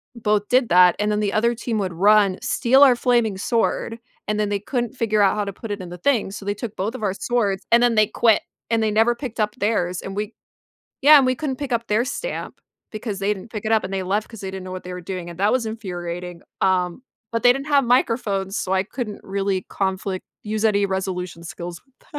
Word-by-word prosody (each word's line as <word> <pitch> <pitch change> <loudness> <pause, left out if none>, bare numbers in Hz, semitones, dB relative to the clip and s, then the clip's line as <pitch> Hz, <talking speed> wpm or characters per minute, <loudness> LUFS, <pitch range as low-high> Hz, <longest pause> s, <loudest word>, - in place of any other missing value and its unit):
both 210 -3 0
did 250 -2 +3
that, 180 0 +6
and 210 0 +1
then 210 - 0
the 205 -1 0
other 235 +2 +2
team 230 -1 -3
would 190 -4 -2
run, 200 +1 +4
steal 265 +2 +3
our 265 -3 +8
flaming 235 -5 +1
sword, 230 +2 -1 0.3
and 210 0 -1
then 210 - 0
they 205 -1 -1
couldn't 240 +3 -3
figure 215 -4 +1
out 195 - +4
how 210 -1 -1
to 200 - -5
put 225 - -9
it 205 - -4
in 180 - -8
the 180 - -8
thing, 230 -2 +1
so 200 -1 -8
they 205 - 0
took 220 0 -6
both 210 +6 -3
of 220 - -7
our 195 - +1
swords, 200 -3 -1
and 235 +1 +6
then 240 -1 +4
they 215 -1 +4
quit, 225 0 +3 0.3
and 225 -1 +2
they 220 - +2
never 225 +3 +3
picked 240 -3 -7
up 210 -1 0
theirs, 185 -4 0
and 195 - -7
we 210 +2 -3 0.7
yeah, 295 +2 +9
and 275 - +4
we 255 - +2
couldn't 275 -1 -3
pick 280 -2 -5
up 230 -1 -1
their 215 +3 +2
stamp, - - -5 0.3
because 215 -2 -5
they 200 +1 +1
didn't 210 +3 -11
pick 215 -2 -6
it 215 - 0
up, 220 -1 +3
and 190 - -5
they 190 - -1
left 205 +3 -1
'cause 225 - -11
they 190 - -4
didn't 190 -1 -6
know 185 - -8
what 185 0 -6
they 180 - -7
were 180 - -6
doing, 180 -1 -6
and 170 0 -11
that 205 +2 +3
was 255 -2 +1
infuriating, 180 -5 -6 0.2
um, 180 +1 +1 0.3
but 230 0 -2
they 245 - +8
didn't 275 +3 -5
have 285 -2 +4
microphones, 225 -5 +1
so 185 - -3
I 190 0 +2
couldn't 215 0 -6
really 195 -1 -1
conflict 190 -1 -2 0.2
use 215 0 -3
any 205 -2 +3
resolution 185 -3 -4
skills 170 0 -7
with 270 -1 -31
210 Hz, 245 wpm, -22 LUFS, 190-235 Hz, 0.7 s, yeah